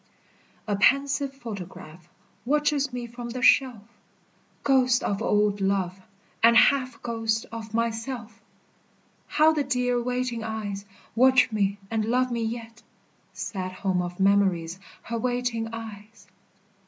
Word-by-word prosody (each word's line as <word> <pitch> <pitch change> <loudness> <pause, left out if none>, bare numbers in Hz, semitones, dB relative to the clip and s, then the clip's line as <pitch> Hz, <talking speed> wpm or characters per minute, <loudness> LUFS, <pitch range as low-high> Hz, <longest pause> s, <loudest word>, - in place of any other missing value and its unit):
A 205 - +1
pensive 275 +6 +2
photograph 185 - -9 0.3
Watches 290 0 +1
me 245 -1 -4
from 240 0 -8
the 250 +1 -5
shelf 250 -6 +4 0.8
Ghost 255 -2 +3
of 200 +1 -1
old 210 -2 +1
love, 195 -1 0 0.4
and 230 0 +6
half 255 -2 +3
Ghost 225 -1 -1
of 225 -1 -7
myself! 230 0 -3 0.9
How 310 +1 +4
the 300 -2 0
dear 250 -2 0
waiting 250 -1 -2
eyes 210 -3 -4 0.3
Watch 255 +1 +5
me 200 -2 0
and 220 -1 0
love 250 +2 +1
me 235 -1 -1
yet 230 0 -5 0.5
Sad 185 -3 -5
home 185 -1 -1
of 175 +1 -6
memories, 190 -3 +2 0.2
Her 230 0 -3
waiting 245 -2 -1
eyes! 215 -2 -9
230 Hz, 125 wpm, -26 LUFS, 200-250 Hz, 0.9 s, and